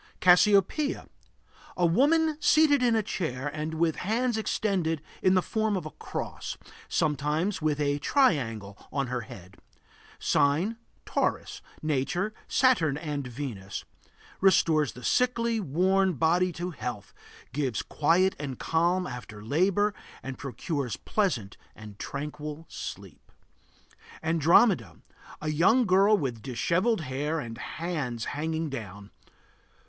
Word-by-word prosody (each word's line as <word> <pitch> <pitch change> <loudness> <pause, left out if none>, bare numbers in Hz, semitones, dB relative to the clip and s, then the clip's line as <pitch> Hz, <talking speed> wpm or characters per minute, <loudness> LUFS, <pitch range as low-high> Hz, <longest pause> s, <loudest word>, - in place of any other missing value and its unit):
CASSIOPEIA. 200 - +4 0.7
A 180 - +3
woman 300 - +3
seated 300 -3 +5
in 240 -2 +3
a 220 - +2
chair 140 -9 -3
and 155 +2 -4
with 165 0 +1
hands 235 +5 0
extended 195 -7 0 0.2
in 185 0 +4
the 185 - +3
form 220 -2 0
of 175 - -5
a 155 - -6
cross; - - -6 0.3
sometimes 155 +6 0
with 150 -1 0
a 145 0 +1
triangle 120 - +1 0.2
on 140 -1 0
her 125 0 -3
head. 95 -4 -12 0.6
Sign: 155 +10 +1 0.3
Taurus. - - -1 0.2
Nature: 160 +8 -1
Saturn 200 - +3
and 150 -4 -4
Venus. 120 -7 -6 0.5
Restores 155 - +3
the 125 - -12
sickly, 235 -2 +1
worn 190 +3 +2
body 170 +5 +2
to 175 +2 -4
health, 120 - -6 0.4
gives 130 -5 -1
quiet 175 +5 +2
and 135 -4 -5
calm 175 +3 +1
after 120 -7 -8
labor 190 - +2 0.3
and 135 0 -5
procures 140 -1 -4
pleasant 135 - -1 0.2
and 105 -2 -12
tranquil 150 +2 -6
sleep. - - -9 0.9
ANDROMEDA. 170 +6 +3 0.4
A 155 - -1
young 195 - +4
girl 200 +2 +5
with 125 - -3
dishevelled 170 - 0
hair, 145 +3 -2
and 115 -5 -7
hands 145 -9 -4
hanging 160 +2 -2
down. 105 -7 -7
160 Hz, 120 wpm, -28 LUFS, 135-195 Hz, 0.9 s, seated